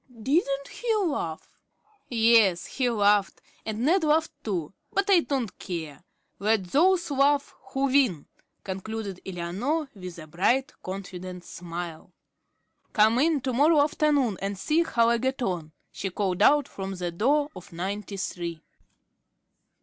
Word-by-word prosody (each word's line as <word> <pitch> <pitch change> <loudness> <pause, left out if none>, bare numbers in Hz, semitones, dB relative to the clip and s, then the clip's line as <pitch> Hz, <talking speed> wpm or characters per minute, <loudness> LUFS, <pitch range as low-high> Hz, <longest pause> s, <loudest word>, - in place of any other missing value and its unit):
"Didn't 275 - +1
he 465 -2 -1
laugh?" 285 - -2 0.6
"Yes, 225 -6 +4
he 255 -2 -1
laughed, 205 -3 +2 0.3
and 220 +3 -2
Ned 350 +4 +3
laughed 315 +1 +2
too; 180 -6 -3 0.2
but 395 - 0
I 370 - +7
don't 265 - -2
care. 165 -4 -6 0.4
'Let 215 0 +2
those 340 - +2
laugh 280 +1 +2 0.2
who 270 +1 0
win,'" 260 - +2 0.4
concluded 195 0 -5
Eleanor, 200 - -2
with 180 -4 -9
a 160 - -9
bright, 195 - +1
confident 185 -1 -7
smile. 170 -1 -7 0.8
"Come 220 +3 +4
in 305 0 +2
to 255 0 -2
morrow 295 +5 +5
afternoon 290 -8 +1
and 195 0 -3
see 305 - +2
how 235 -8 +2
I 235 0 +3
get 260 +1 -1
on," 175 -7 -2 0.2
she 195 - -4
called 185 0 -2
out 290 +5 +5
from 195 -4 -6
the 180 -1 -3
door 285 - +2
of 185 - -11
Ninety 195 +4 -4
three. 170 -4 -4
220 Hz, 140 wpm, -26 LUFS, 185-280 Hz, 0.8 s, I